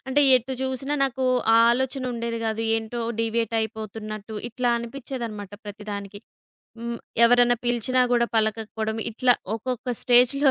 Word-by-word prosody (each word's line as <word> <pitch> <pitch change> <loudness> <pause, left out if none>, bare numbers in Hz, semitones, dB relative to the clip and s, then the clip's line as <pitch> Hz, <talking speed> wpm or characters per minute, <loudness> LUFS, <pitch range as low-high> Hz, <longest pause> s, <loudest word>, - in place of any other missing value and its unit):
అంటే 290 +2 +3
ఎటు 255 +2 -4
జూసినా 265 +2 -2
నాకు 265 0 -2 0.3
ఆ - - +7
ఆలోచనుండేది 245 -2 -2
గాదు. 220 0 -1
ఏంటో 225 +2 -4 0.2
డీవియేట్ 230 0 -1
అయిపోతున్నట్టు 215 -1 -6
ఇట్లా 245 +1 0
అనిపించేదన్నమాట 235 -4 -6
ప్రతిదానికి. 205 -1 -7 0.6
హ్మ్. 235 0 -4 0.3
ఎవరన్నా 245 0 +5
పిలిచినా 245 +2 +2
గూడా 235 0 +3
పలకకపోడం 220 0 -1 0.2
ఇట్లా 245 +2 +3 0.2
ఒక్కొక్క 250 +1 -3
స్టేజ్‌లో 255 +3 +5
235 Hz, 120 wpm, -24 LUFS, 220-255 Hz, 0.6 s, ఆ